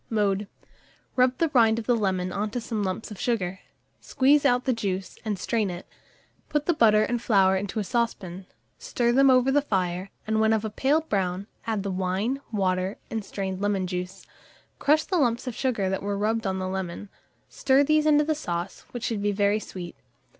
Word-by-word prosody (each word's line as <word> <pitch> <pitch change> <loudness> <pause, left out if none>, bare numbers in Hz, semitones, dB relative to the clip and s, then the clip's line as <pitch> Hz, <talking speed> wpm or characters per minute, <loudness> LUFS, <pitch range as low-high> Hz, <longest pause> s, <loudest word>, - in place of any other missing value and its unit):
Mode. 205 -2 0 0.7
Rub 255 0 +3
the 330 - +1
rind 230 -5 +4
of 230 - -4
the 245 - +3
lemon 185 -4 -1
on 205 +3 -2
to 245 - -3
some 225 -2 -3
lumps 195 +3 -3
of 205 - -8
sugar; 190 -6 -1 0.4
squeeze 285 +2 +3
out 250 -2 +3
the 260 - +2
juice, 195 -5 -4
and 210 -3 -2
strain 215 +2 0
it; 175 0 -7 0.6
put 295 -1 0
the 345 - +3
butter 215 -6 +5
and 240 +1 -1
flour 195 -5 +4
into 195 +2 -3
a - - 0
saucepan, 195 -5 -2 0.3
stir 240 -1 0
them 270 +2 +5
over 255 0 +4
the 290 +2 +4
fire, 185 -6 -2 0.2
and 220 0 +1
when 220 0 +4
of 220 0 0
a 215 - -3
pale 280 +8 +2
brown, 195 - -2 0.2
add 215 -3 -1
the 200 - -2
wine, 190 +8 -1
water, 185 -2 0
and 225 -2 -2
strained 190 -1 -4
lemon 200 -2 0
juice. 180 +1 -5 0.5
Crush 305 +2 +3
the 365 -3 0
lumps 240 -3 +1
of 250 - -3
sugar 225 -5 -1
that 190 0 -1
were 200 0 -2
rubbed 220 +1 0
on 190 0 -1
the 185 0 -3
lemon; 190 +1 -4 0.4
stir 270 +1 +3
these 310 +1 +3
into 300 0 +5
the 310 +1 +1
sauce, 175 - -5
which 240 -2 -7
should 225 -5 -1
be 205 0 +1
very 205 +1 +2
sweet. 180 -4 -8
210 Hz, 200 wpm, -26 LUFS, 190-245 Hz, 0.7 s, butter